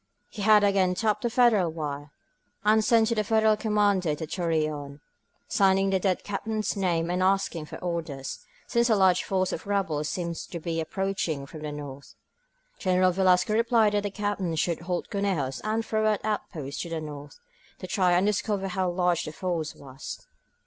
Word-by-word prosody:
He 215 - -7
had 210 0 +6
again 195 -2 +3
tapped 210 +1 0
the 240 - 0
Federal 230 -7 +4
wire, 150 -2 -5 0.6
and 215 +1 +4
sent 225 0 +4
to - - +2
the 215 -2 0
Federal 220 0 +3
commander 205 -4 +1
in 150 - +1
Torreon, 155 -3 -2 0.5
signing 195 0 +3
the 190 - +2
dead 185 -1 0
Captain's 215 +1 -2
name 175 -3 0
and 180 +1 0
asking 185 -4 +1
for - - -8
orders, 165 -6 -4 0.3
since 235 0 +1
a 220 - +5
large 190 -2 +4
force 185 -1 0
of 160 - -6
rebels 165 -7 0
seemed 170 -2 -3
to 170 - -6
be 165 0 -2
approaching 170 -5 -2
from 155 +3 -10
the 150 -1 -4
north. 140 -2 -9 0.6
General 185 -1 +3
Velasco 185 +2 +3
replied 230 -2 +3
that 205 - +2
the 205 - -2
Captain 200 -4 -2
should 165 +1 0
hold 175 +1 -4
Conejos 180 -10 -1
and 220 +1 -1
throw 215 0 +1
out 215 -1 0
outposts 155 -9 -3
to 170 - -5
the 165 -1 -3
north, 145 -2 -8 0.4
to - - -8
try 185 -3 +2
and 180 +2 +3
discover 205 -1 0
how 185 0 0
large 175 -1 +1
the 155 - -5
force 165 -2 -3
was. 135 -1 -9
185 Hz, 180 wpm, -27 LUFS, 160-205 Hz, 0.6 s, had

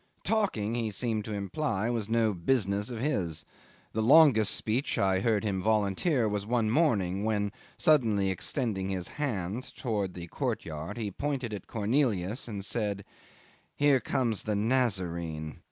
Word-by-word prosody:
Talking, 190 - 0
he 115 -2 -1
seemed 110 0 -2
to 110 - -4
imply, 100 +1 -2
was 110 -3 -2
no 115 -2 +2
business 100 +2 0
of 120 -3 -5
his. 90 - -1 0.5
The 110 - 0
longest 125 -4 +6
speech 120 +6 -1
I 95 -1 +2
heard 110 0 +1
him 100 -3 -1
volunteer 110 - +1
was 105 -1 -1
one 110 0 +1
morning 105 - +2
when, 105 -2 0 0.3
suddenly 110 -10 +3
extending 95 - -2
his 95 -2 -3
hand 110 -3 -2
towards 105 -6 -2
the 85 -1 -6
courtyard, 80 +2 -4
he 105 -3 -3
pointed 135 -1 -3
at 100 - -7
Cornelius 110 -2 0
and 100 -4 -5
said, 105 -4 -1 0.7
"Here 145 -2 +4
comes 120 -5 0
the 105 -1 -2
Nazarene." 90 - -1
110 Hz, 145 wpm, -29 LUFS, 95-120 Hz, 0.7 s, longest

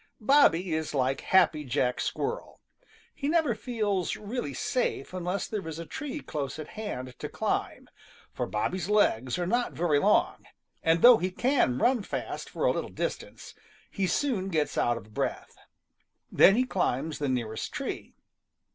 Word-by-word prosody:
Bobby 195 - +4
is 155 -1 -2
like 130 0 0
Happy 165 -5 +3
Jack 125 -1 0
Squirrel, 475 +3 -3 0.5
he 280 - -4
never 315 -5 +2
feels 210 -4 -1
really 230 +4 -4
safe 480 - -2
unless 180 +1 -2
there 205 -6 -4
is 160 -1 -5
a 165 - -6
tree 295 - -5
close 140 -2 -4
at 155 -1 -7
hand 130 -13 -6
to - - -5
climb, - - -2 0.5
for - - -3
Bobby's 175 - -2
legs 130 - +2
are 175 - -1
not 240 +6 0
very 160 -3 +2
long, - - +2 0.4
and 165 +1 +2
though 245 -1 +10
he 185 - -1
can 240 - +1
run 245 - +2
fast - - -5
for - - -2
a - - +4
little - - -3
distance, - - -5 0.4
he 195 -1 -1
soon 210 -6 0
gets 155 -4 0
out 120 -1 +1
of 110 -2 -12
breath. - - -3 0.8
Then 195 - +7
he 250 - +3
climbs 160 - -1
the 145 -2 -1
nearest 115 -4 -2
tree. - - -5
180 Hz, 160 wpm, -28 LUFS, 145-235 Hz, 0.8 s, though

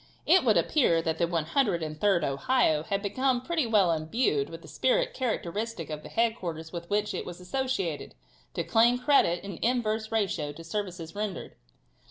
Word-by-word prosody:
It - - +5
would - - +4
appear 240 - +3
that 160 0 -2
the 170 - +2
103d 170 - +1
Ohio 150 - +2
had 200 +5 -2
become 255 +5 +1
pretty 320 -4 0
well 205 -6 +4
imbued 155 - 0
with 165 +1 -9
the - - -12
spirit - - +1
characteristic 220 - -3
of 150 0 -5
the - - -10
headquarters 180 -9 -2
with 170 0 -6
which 210 +1 0
it - - -3
was 175 0 -8
associated, 190 - -3 0.4
to - - -1
claim 235 +2 +4
credit 250 - +3
in 200 - -6
an 170 - -9
inverse 225 -2 0
ratio 180 -9 -1
to 165 +3 -11
services 175 -2 -5
rendered. 205 -2 -4
200 Hz, 170 wpm, -28 LUFS, 165-235 Hz, 0.4 s, It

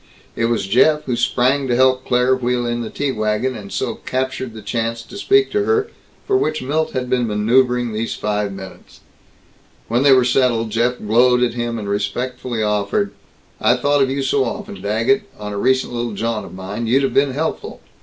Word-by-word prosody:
It 115 - 0
was 115 -3 0
Jeff 140 +9 +3
who 125 - -2
sprang 130 +3 +1
to 120 - +1
help 130 0 +3
Claire 125 +1 +3
wheel 125 -1 -1
in 120 0 -2
the 115 - -5
tea 145 -1 -2
wagon, 110 +3 -1
and 100 -3 -9
so - - -2
captured 130 -2 -3
the 110 - -9
chance 115 +2 -2
to 160 - -13
speak 400 - +2
to 415 +1 +1
her 440 0 +1 0.3
for 400 - +1
which 155 - 0
Milt 155 +4 -1
had 130 -1 -2
been 125 -1 +1
maneuvering 120 +3 +2
these 110 +1 -2
five 105 -1 -2
minutes. 95 -1 -11 0.9
When 120 +2 +2
they 140 0 +5
were 130 -2 +5
settled, 120 -3 +1
Jeff 120 +3 +1
glowed 125 +3 +3
at 120 -2 +1
him, 120 -1 -3
and 105 -2 -5
respectfully 115 +3 -2
offered, 100 -1 0 0.5
"I 120 - +3
thought 145 +3 +1
of 135 - +3
you 135 +1 -1
so 135 +1 +2
often, 205 +5 -6
Daggett, 115 - +1
on 105 0 -6
a - - -4
recent 130 +2 +1
little 120 -2 -3
jaunt 110 0 -2
of - - -11
mine. 100 +5 -5
You'd 135 +4 +3
have 135 - 0
been 135 -1 +2
helpful." 155 +4 -3
125 Hz, 200 wpm, -19 LUFS, 110-130 Hz, 0.9 s, they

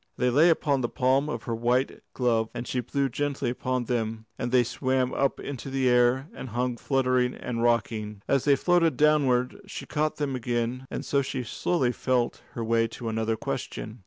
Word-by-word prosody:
They 125 0 +2
lay 155 +7 +6
upon 145 -4 +2
the 120 - -1
palm 135 +5 +2
of - - -4
her 115 - -3
white 120 +3 0
glove, 115 -3 +1
and 120 - -4
she 125 - -1
blew 135 +3 0
gently 140 -3 -2
upon 125 0 -2
them, 115 -2 -2
and 120 - -3
they 125 -1 +5
swam 130 +1 0
up 140 - 0
into 135 -1 -6
the 135 -1 +1
air 125 +2 +3
and 130 - -7
hung 120 +1 -1
fluttering 130 -1 +1
and 115 -2 -4
rocking. 110 -3 0
As 135 -2 +2
they 145 -1 +5
floated 170 +2 +2
downward 140 -5 +3
she - - -7
caught 155 0 -1
them 140 -3 -2
again, 120 +1 -2
and - - -5
so 140 - +2
she 130 -1 -3
slowly 130 +2 0
felt 125 -1 0
her 115 - -3
way 115 0 +2
to 115 0 -6
another 110 0 0
question. 110 +1 -5
125 Hz, 190 wpm, -27 LUFS, 120-135 Hz, -, lay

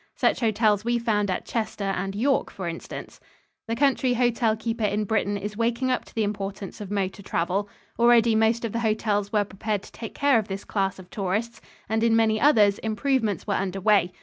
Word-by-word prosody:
Such - - +2
hotels 215 -3 +2
we 240 +1 +1
found 210 -3 0
at 185 - -2
Chester 215 -3 -3
and 195 +1 -3
York, 265 +6 +1
for 185 -3 -6
instance. 165 0 -7 0.5
The 230 - -1
country 260 -1 +2
hotel 235 -2 +2
keeper 225 +1 -3
in 210 +1 +1
Britain 205 -1 0
is 205 +1 -5
waking 235 +3 0
up 250 - -1
to - - -18
the 225 - +1
importance 200 0 -4
of 200 - -6
motor 200 0 -2
travel. 190 +2 -1 0.3
Already 235 -1 +5
most 225 +2 +2
of 225 - -3
the 230 - -2
hotels 215 -2 0
were 210 -1 +3
prepared 205 +1 -3
to - - -13
take 225 - -8
care 280 -4 +4
of 215 - -4
this 195 -1 -5
class 195 -2 -1
of 185 -1 -13
tourists, 210 +4 -2 0.3
and 220 +1 0
in 230 -1 +4
many 220 -1 +2
others 215 -8 +5
improvements 220 0 0
were 205 - -1
under 195 0 -2
way. 195 -2 +3
215 Hz, 200 wpm, -25 LUFS, 200-230 Hz, 0.5 s, Already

